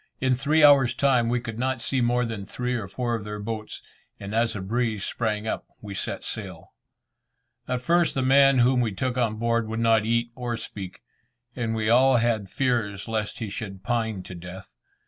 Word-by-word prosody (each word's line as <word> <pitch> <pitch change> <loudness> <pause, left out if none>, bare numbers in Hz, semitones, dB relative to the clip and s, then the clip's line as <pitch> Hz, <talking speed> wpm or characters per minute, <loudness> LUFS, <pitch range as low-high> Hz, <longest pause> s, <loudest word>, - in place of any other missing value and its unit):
In 130 -1 +2
three 150 +5 +2
hours' 135 -4 +6
time, 125 -4 +2
we 120 +1 +1
could 115 -1 -7
not 130 0 0
see 130 +3 0
more 120 +1 +2
than 115 -3 -5
three 125 +5 -3
or 110 -5 -3
four 120 +4 -2
of 115 -3 -2
their 105 0 -5
boats, 110 +1 -6 0.4
and 100 +1 -7
as 115 0 +1
a - - -3
breeze 110 0 -1
sprang 110 -2 -2
up - - -3
we 105 -1 -8
set - - -4
sail. - - -7 0.9
At 125 -1 -1
first 170 +4 +2
the 135 - 0
man 135 +1 +5
whom 125 +1 +4
we 115 -4 -1
took 125 +5 -2
on 120 -4 0
board 115 0 0
would 110 +1 -3
not 115 -2 +4
eat 115 +1 0
or 120 -1 -3
speak, 95 -4 -7 0.5
and 115 -2 -2
we 110 -1 -1
all 130 +3 +5
had 115 -4 0
fears 115 -6 -1
lest 110 -2 -2
he 110 - -4
should 95 -3 -6
pine 110 -3 -1
to 95 - -9
death. 90 +2 -10
115 Hz, 200 wpm, -25 LUFS, 110-125 Hz, 0.9 s, hours